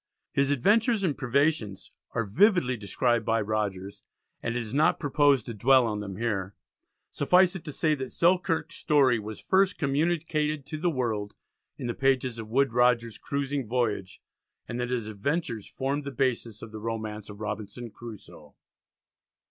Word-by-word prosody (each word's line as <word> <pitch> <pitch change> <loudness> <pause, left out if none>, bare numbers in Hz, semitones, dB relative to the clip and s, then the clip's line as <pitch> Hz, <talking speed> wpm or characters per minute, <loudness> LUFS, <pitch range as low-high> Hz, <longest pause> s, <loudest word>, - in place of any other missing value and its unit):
His 140 0 +2
adventures 210 - +3
and 160 -7 +1
privations 130 - 0 0.2
are 115 - 0
vividly 165 - +3
described 115 +2 0
by 115 +1 +1
Rogers, 100 -2 -3 0.4
and 115 - -2
it - - 0
is 115 -2 -6
not 150 +3 +3
proposed 145 -4 +3
to 120 - -5
dwell 130 +4 +4
on 105 -2 -2
them 100 -2 -6
here. 100 -3 -2 0.6
Suffice 180 +5 +4
it 185 - -6
to 150 - -5
say 155 +2 +1
that 130 -3 -4
Selkirk's 170 -2 +1
story 135 -6 +3
was 105 0 -7
first 190 0 +2
communicated 150 0 0
to 155 +2 -6
the 175 +2 +1
world 110 -8 -2 0.4
in - - -6
the 120 - -1
pages 130 -3 +1
of 110 -1 -7
Woodes 135 +2 +2
Rogers's 120 -2 +2
"Cruising 140 -2 -2
Voyage," 105 -5 -2 0.4
and 120 - -4
that 125 0 -2
his 125 -3 -1
adventures 115 - -2
formed 140 +2 -2
the 140 - -4
basis 120 -5 -2
of 115 - -9
the 110 - -7
romance 110 -1 -5
of 100 0 -10
Robinson 110 +2 -5
Crusoe. 95 -11 -12
125 Hz, 165 wpm, -27 LUFS, 110-145 Hz, 0.6 s, dwell